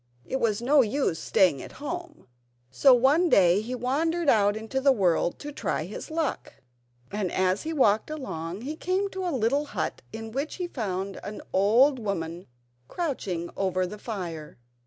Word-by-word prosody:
It 265 - -2
was 230 -1 0
no 280 +3 +5
use 225 - 0
staying 160 -5 +3
at - - -10
home, 335 +3 -7 0.5
so 270 - +5
one 275 +8 +4
day 185 - +5
he 245 +4 -4
wandered 310 +6 0
out 205 -1 +4
into 225 +5 -3
the 275 0 +5
world 180 -7 +1
to 295 - -7
try 285 - -2
his - - -7
luck, 315 -2 -3 0.6
and 200 -3 -2
as 185 +1 +1
he 320 - -4
walked 220 -8 +2
along 195 - -5
he 290 +5 -4
came 375 +4 -1
to 380 0 -4
a - - +1
little 275 +1 +1
hut - - -4
in 225 0 -7
which 275 +6 -3
he 360 -2 -3
found 195 - -4
an 210 - -7
old 240 +8 +4
woman 175 -5 -4 0.4
crouching 195 - -3
over 185 -1 0
the 210 +4 -8
fire. 170 -9 -6
230 Hz, 170 wpm, -27 LUFS, 190-290 Hz, 0.6 s, no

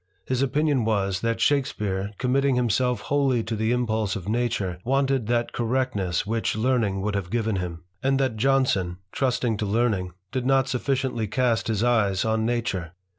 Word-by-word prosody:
His 130 0 -1
opinion 145 -1 +1
was, 100 -3 0
that 115 -1 0
Shakespeare, 105 -9 0
committing 135 +1 +2
himself 125 +1 +1
wholly 135 -5 +1
to 110 0 -3
the 110 +1 0
impulse 110 -4 0
of 95 -3 -6
nature, 110 -6 -1
wanted 135 -2 +1
that 120 0 0
correctness 115 -8 0
which 110 +1 -1
learning 110 -4 +1
would 105 +1 -1
have 100 -3 -2
given 110 -1 0
him; 90 -1 -5 0.2
and 135 0 +2
that 130 -4 +1
Jonson, 110 -8 +1
trusting 125 -4 0
to 105 - -2
learning, 100 -4 0 0.2
did 130 +1 -2
not 135 -1 +3
sufficiently 130 -3 -1
cast 120 +1 +1
his 110 -1 0
eyes 105 -6 +2
on 110 0 +1
nature. 100 -9 -2
115 Hz, 165 wpm, -25 LUFS, 105-130 Hz, 0.2 s, not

